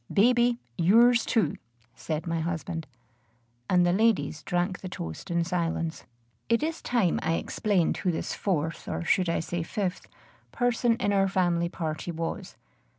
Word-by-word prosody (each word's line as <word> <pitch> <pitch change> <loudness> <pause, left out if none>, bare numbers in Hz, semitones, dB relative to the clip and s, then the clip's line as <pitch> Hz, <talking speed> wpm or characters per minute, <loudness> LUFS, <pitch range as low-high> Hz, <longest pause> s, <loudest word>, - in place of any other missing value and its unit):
Baby, 240 +3 +4 0.2
yours 230 +7 +5
too!" 215 - +1 0.4
said 155 +5 -4
my 165 -1 -1
husband; 165 -1 -3 0.8
and 180 -1 +4
the 175 - +3
ladies 185 -8 +2
drank 180 +3 -1
the 185 - -7
toast 80 - -7
in 170 0 +1
silence. 165 -2 -2 0.4
It 230 +4 +3
is 325 +1 -2
time 230 -8 +1
I 160 - 0
explained 185 +1 0
who 185 - 0
this 160 - -3
fourth 165 -4 -2
or - - -3
should 180 +1 +2
I 165 - +1
say 175 +1 -3
fifth? 180 +2 -3 0.4
person 245 -1 +2
in 205 -4 0
our 195 -1 +3
family 175 -3 +1
party 160 -1 -4
was. 165 0 -5
180 Hz, 150 wpm, -27 LUFS, 165-215 Hz, 0.8 s, yours